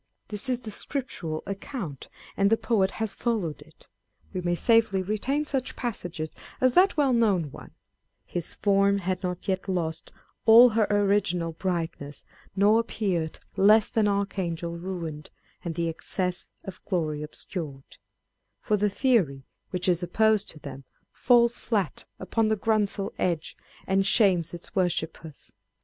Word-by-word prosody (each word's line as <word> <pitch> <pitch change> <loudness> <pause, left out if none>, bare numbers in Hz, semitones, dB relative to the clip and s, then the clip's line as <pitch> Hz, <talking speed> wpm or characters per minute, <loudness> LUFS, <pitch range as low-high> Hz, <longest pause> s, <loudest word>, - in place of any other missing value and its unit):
This 210 +5 -3
is 250 -1 0
the 220 -3 -7
Scriptural 185 - -3
account, 195 - -6 0.3
and 200 0 +3
the 225 - +4
poet 220 -4 +1
has 220 -2 -2
followed 210 -10 -2
it. - - -19 0.5
We 185 - -2
may 175 0 0
safely 225 -2 +3
retain 250 +10 -1
such 270 -3 -2
passages 175 -9 -4 0.3
as 255 -1 +3
that 370 -1 +4
well 280 -3 +3
known 200 - +2
one - - -11
â€" - - -30 0.5
His 175 -2 -3
form 200 0 +3
had 185 -1 -2
not 180 -2 -4
yet 190 0 -1
lost 165 -3 -2 0.4
All 235 +3 +9
her 220 -1 +2
original 200 -4 +1
brightness; 165 -4 -4 0.3
nor 205 +3 +5
appear'd 190 -8 -2 0.2
Less 210 +2 +5
than 220 -2 +2
archangel 185 -4 -2
ruin'd; 170 -4 -6 0.3
and 170 -2 -4
the 170 0 0
excess 180 +2 -3
Of 190 -1 -9
glory 155 -6 -1
obscur'd 150 -2 -6
â€" - - -18 0.6
for 210 - 0
the 210 +1 +2
theory, 195 - +1 0.3
which 180 0 -2
is 175 -1 +2
opposed 215 +4 +2
to 155 - -6
them, 140 -2 -9 0.2
" - - -44
falls 235 -1 +3
flat 200 - -1
upon 215 +4 0
the 220 - +2
grunsel 205 -2 0
edge, 170 -4 -1 0.3
and 195 0 +2
shames 190 -5 +3
its 175 -1 -10
worshippers." 165 -4 -2
195 Hz, 150 wpm, -27 LUFS, 170-220 Hz, 0.6 s, All